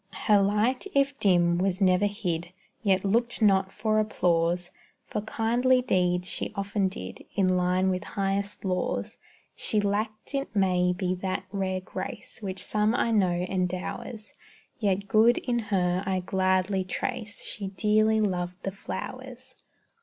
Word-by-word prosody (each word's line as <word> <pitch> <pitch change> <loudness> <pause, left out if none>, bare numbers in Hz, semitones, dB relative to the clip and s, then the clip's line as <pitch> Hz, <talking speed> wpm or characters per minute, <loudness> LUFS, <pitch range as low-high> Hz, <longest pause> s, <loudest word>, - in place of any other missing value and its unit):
Her 205 -2 +5
light, 210 - +1
if 280 0 +2
dim, 175 -3 +3
was 190 0 0
never 185 +1 +4
hid, 175 -5 -3 0.3
Yet 195 -2 +2
looked 235 +4 +1
not 195 -3 +3
for 215 -1 +1
applause; 175 -4 +1 0.3
For 210 - -3
kindly 240 +4 +2
deeds 180 -5 +1
she - - -2
often 200 0 0
did, 95 - -7
In 195 -2 +3
line 180 +1 +2
with 185 -1 -2
highest 200 +1 -2
laws. 185 -1 -2 0.4
She 215 - 0
lacked 215 +4 -2
it 275 -4 -3
may 180 -2 +3
be 180 0 -1
that 190 0 -2
rare 190 -2 -1
grace 185 +3 -7
Which 190 -2 -4
some 215 +2 +1
I 235 - +1
know 180 -5 +2
endowers, 185 +4 -3 0.5
Yet 200 -2 0
good 220 +4 +5
in 240 -2 -1
her 185 -4 0
I 190 -1 -1
gladly 190 +1 +1
trace 220 +3 -3
_She 195 -2 -5
dearly 215 +1 +3
loved 180 -2 -2
the 195 - -2
flowers. 255 +6 -7
195 Hz, 145 wpm, -27 LUFS, 185-215 Hz, 0.5 s, Her